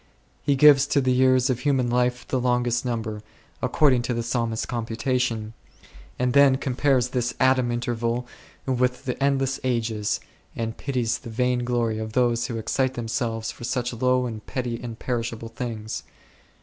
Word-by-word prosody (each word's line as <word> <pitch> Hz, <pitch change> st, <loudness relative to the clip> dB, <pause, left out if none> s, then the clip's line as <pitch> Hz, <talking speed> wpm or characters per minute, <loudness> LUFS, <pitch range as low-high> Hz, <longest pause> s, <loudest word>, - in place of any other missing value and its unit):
He 140 Hz, -, +2 dB
gives 145 Hz, 0 st, +7 dB
to 145 Hz, -, +2 dB
the 130 Hz, -2 st, +2 dB
years 130 Hz, 0 st, +4 dB
of 125 Hz, -, -2 dB
human 135 Hz, -2 st, +1 dB
life 125 Hz, 0 st, 0 dB
the 130 Hz, -, 0 dB
longest 125 Hz, -1 st, +1 dB
number, 110 Hz, -4 st, -3 dB, 0.4 s
according 135 Hz, -5 st, +3 dB
to 120 Hz, 0 st, -2 dB
the 115 Hz, -, -1 dB
Psalmist's 115 Hz, -1 st, -1 dB
computa 120 Hz, +2 st, -1 dB
tion, 115 Hz, -3 st, -2 dB, 0.6 s
and 125 Hz, 0 st, 0 dB
then 140 Hz, -2 st, +6 dB
compares 130 Hz, -1 st, +1 dB
this 125 Hz, -1 st, -1 dB
atom 130 Hz, -2 st, +3 dB
interval 120 Hz, 0 st, -1 dB, 0.4 s
with 125 Hz, -1 st, 0 dB
the 125 Hz, +1 st, -2 dB
endless 135 Hz, -1 st, +1 dB
ages, 115 Hz, -4 st, 0 dB, 0.4 s
and 115 Hz, 0 st, -3 dB
pities 120 Hz, -4 st, -1 dB
the -, -, -9 dB
vain 125 Hz, +2 st, 0 dB
glory 120 Hz, -3 st, 0 dB
of 110 Hz, 0 st, -5 dB
those 120 Hz, -1 st, +2 dB
who 115 Hz, -, -4 dB
excite 130 Hz, +4 st, 0 dB
themselves 115 Hz, -1 st, -2 dB
for -, -, -12 dB
such 125 Hz, 0 st, -1 dB
low 125 Hz, +1 st, +2 dB
and 110 Hz, -3 st, -6 dB
petty 120 Hz, -3 st, -3 dB
and 115 Hz, -2 st, -6 dB
perishable 115 Hz, -2 st, -3 dB
things. 115 Hz, -2 st, -5 dB
125 Hz, 160 wpm, -24 LUFS, 115-130 Hz, 0.6 s, gives